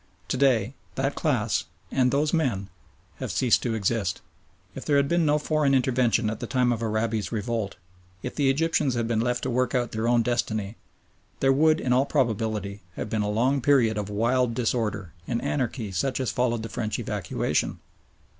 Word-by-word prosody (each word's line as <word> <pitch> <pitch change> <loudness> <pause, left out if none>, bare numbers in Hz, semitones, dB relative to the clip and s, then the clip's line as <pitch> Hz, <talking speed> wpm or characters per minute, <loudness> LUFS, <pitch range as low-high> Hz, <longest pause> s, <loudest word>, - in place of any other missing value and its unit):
To - - 0
day 125 -3 +3 0.2
that - - 0
class, - - 0 0.3
and 130 -2 +3
those 145 +3 +1
men, 120 - 0 0.5
have - - -4
ceased 125 -3 +3
to 115 -2 -1
exist. 105 -3 0 0.5
If - - -7
there 145 - +1
had 140 0 +3
been 170 0 +2
no 150 0 +4
foreign 150 -2 +2
intervention 120 -3 +2
at 110 0 -3
the - - -4
time 125 -2 +2
of 115 - -4
Arabi's 110 -1 -1
revolt, 110 -2 -2 0.5
if - - -4
the 140 -3 +2
Egyptians 150 -2 +1
had 115 -1 0
been 115 -1 +1
left 120 +1 -1
to - - -1
work 125 +2 +1
out 120 -2 0
their 110 +1 -1
own 120 -1 +4
destiny, 110 -3 -1 0.6
there 135 0 +4
would 155 +3 +4
in 125 - +1
all 130 +3 +3
probability 110 -6 -1
have 105 - -5
been 110 - +1
a 105 - -1
long 125 +6 +1
period 120 -5 +4
of 105 -1 -3
wild 115 +3 +1
disorder 110 -7 -1
and 120 - -1
anarchy 125 -6 -2
such 130 +10 -1
as 130 - -1
followed 120 -2 0
the - - -4
French 110 -2 -2
evacuation. - - -1
120 Hz, 185 wpm, -26 LUFS, 110-135 Hz, 0.6 s, no